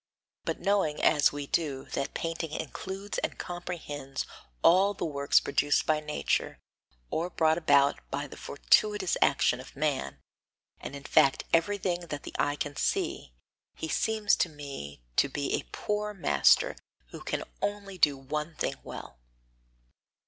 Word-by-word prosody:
But - - -2
knowing, 195 -7 +1
as 145 - +4
we 145 0 -5
do, 140 -3 -1
that 135 - -2
painting 165 -1 -3
includes 190 +6 -4
and - - -3
comprehends 160 -6 -5 0.4
all 195 +4 +5
the - - -3
works 140 -3 +3
produced 145 - +1
by 155 -1 +2
nature, 150 0 -1 0.5
or 170 +3 -1
brought 160 -1 +2
about 140 -3 +4
by 140 +1 -2
the 145 - -10
fortuitous 205 +5 +2
action 140 - +3
of 130 - -11
man, 145 -1 -1 0.6
and 140 - -7
in 140 - -8
fact 135 0 +4
everything 175 0 +1
that 145 -3 -5
the - - -8
eye 145 - +2
can 145 0 -4
see, - - -1 0.4
he 160 - -4
seems 215 +5 +2
to 175 - +1
me 135 - -8
to 140 - +4
be 140 +1 -2
a - - -1
poor 210 0 -2
master - - +4 0.3
who - - -8
can - - -2 0.2
only 200 -2 -3
do 145 -3 +4
one 150 +4 -4
thing - - -2
well. 60 - -9
155 Hz, 150 wpm, -29 LUFS, 140-185 Hz, 0.6 s, all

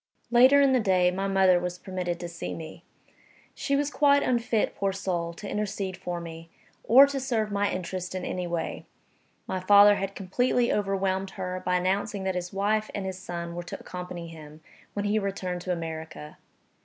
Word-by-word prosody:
Later 255 +4 +7
in 275 -1 +4
the 255 - +4
day, 185 -4 +3
my 195 +2 -2
mother 190 -2 +4
was 180 0 -4
permitted 180 -2 -4
to 175 - -4
see 170 -1 -6
me. 160 -1 -9 0.7
She 280 - -1
was 290 +1 0
quite 285 -1 +4
unfit, 235 -3 +1
poor 195 -1 0
soul, 180 -3 -2
to 200 +4 -9
intercede 200 -2 -3
for 175 -1 -5
me, 165 0 -9 0.3
or 260 +5 +8
to 280 -1 -3
serve 230 -5 -1
my 205 0 +1
interests 185 0 -4
in 185 - -3
any 180 -1 -3
way. 170 -1 -4 0.6
My 185 - -3
father 205 +2 +7
had 195 0 -4
completely 240 +5 +1
overwhelmed 195 -1 0
her 185 -1 -4
by 180 0 +1
announcing 195 +2 0
that 190 0 0
his 180 0 -4
wife 215 +2 0
and 200 - -3
his 190 -1 -5
son 170 -2 -5
were 175 - -4
to 175 - -8
accompany 180 -1 -7
him, 155 -1 -12 0.3
when 205 0 -2
he 210 +1 +2
returned 185 -3 -3
to 180 - -3
America. 160 -3 -6
190 Hz, 185 wpm, -27 LUFS, 175-205 Hz, 0.7 s, or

